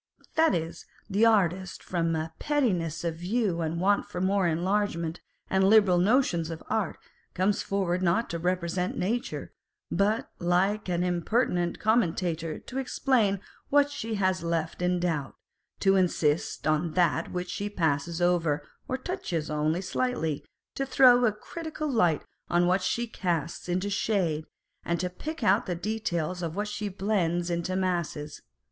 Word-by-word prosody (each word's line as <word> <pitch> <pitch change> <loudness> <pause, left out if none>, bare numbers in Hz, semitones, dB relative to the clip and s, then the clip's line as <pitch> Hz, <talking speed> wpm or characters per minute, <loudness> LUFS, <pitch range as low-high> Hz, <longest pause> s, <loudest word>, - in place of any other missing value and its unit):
That 320 - +4
is, 165 0 -4 0.2
the 210 +4 +5
artist, 190 -4 +1
from 165 -2 0
a 160 +1 -3
pettiness 185 - 0
of 165 -1 -2
view 185 -1 0
and 165 +1 -2
want 200 +3 +2
of 180 - -1
more 195 -1 +2
enlarged 190 +4 +1 0.5
and 190 0 +2
liberal 195 -3 +5
notions 185 -5 +2
of 165 -1 -6
art, 215 -6 0 0.4
comes 195 +3 +2
forward 185 -2 -1
not 185 +6 +2
to 170 - -3
represent 180 +1 -1
nature, 225 +7 -2 0.4
but 205 +5 +1
like 185 +4 +1
an 175 0 +1
impertinent 175 0 0
commentator 175 -7 +1
to 265 - -6
explain 240 -7 +1 0.3
what 290 0 +4
she 225 -5 -3
has 185 -2 +1
left 165 0 -2
in 180 0 +1
doubt, 165 -6 -2 0.5
to 195 -1 +4
insist 165 -4 +1
on 155 +1 +1
that 175 -2 +2
which 180 0 -3
she 205 +2 -3
passes 165 -3 0
over 165 -4 +1 0.2
or 260 - -1
touches 180 - -3
only 155 +3 0
slightly, 190 - -1 0.3
to 275 - -2
throw 250 -2 +6
a 220 - +4
critical 310 +8 -6
light 180 - +2 0.3
on 175 0 +3
what 185 +2 +2
she 235 +5 0
casts 175 -7 -3
into 185 +3 0
shade, 180 -7 0 0.4
and 170 0 -1
to 180 0 -2
pick 315 - -6
out 195 +4 +3
the 180 - -1
details 180 -3 -2
of 165 -1 -3
what 205 +1 -1
she 210 0 -3
blends 180 -3 0
into 170 +2 -1
masses. 170 -5 -2
180 Hz, 155 wpm, -28 LUFS, 170-210 Hz, 0.5 s, throw